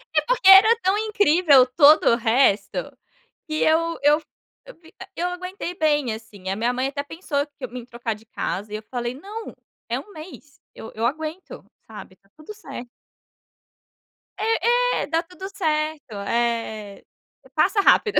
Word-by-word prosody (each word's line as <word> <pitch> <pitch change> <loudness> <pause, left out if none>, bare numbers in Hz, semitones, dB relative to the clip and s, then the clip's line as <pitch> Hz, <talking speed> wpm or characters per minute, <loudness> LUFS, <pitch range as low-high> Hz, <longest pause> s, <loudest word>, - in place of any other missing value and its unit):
É - - +4
porque - - +1
era 395 +4 +9
tão 380 +2 +2
incrível 360 -10 +4
todo 285 +4 +5
o - - +4
resto, 225 -3 +1 0.7
que 310 - -5
eu 330 +1 +1
eu 295 +2 +4
fi - - -27 0.4
eu - - -12
fic 330 -1 -20 0.2
eu 355 +1 -1
aguentei 360 0 -6
bem 295 -8 +1
assim, 215 -4 -11
a 190 - -1
minha 235 +3 0
mãe 255 +2 -1
até 285 0 -4
pensou 290 -2 -3
que 285 - -13
em - - -19
me 245 -1 -9
trocar 235 -2 -4
de 215 +2 -17
casa 205 0 -5
e - - -2
eu 215 - -9
falei: 245 -1 -3
"Não, 410 +10 -9 0.3
é - - -2
um 415 - -16
mês, 310 -4 -12 0.2
eu 220 - -10
eu 225 - -3
aguento.", 315 - -5 0.2
sabe, 210 -3 -12
tá 195 0 -34
tudo 310 +7 -11
certo. 250 - -9 1.5
É, 485 +3 +1
é, - - -6
dá 325 +2 0
tudo 365 +3 -10
certo, 305 - -2 0.2
é, 230 -3 -2 0.5
e - - -18
passa 410 - +3
rápido. 420 +1 +4
300 Hz, 170 wpm, -23 LUFS, 235-365 Hz, 1.5 s, era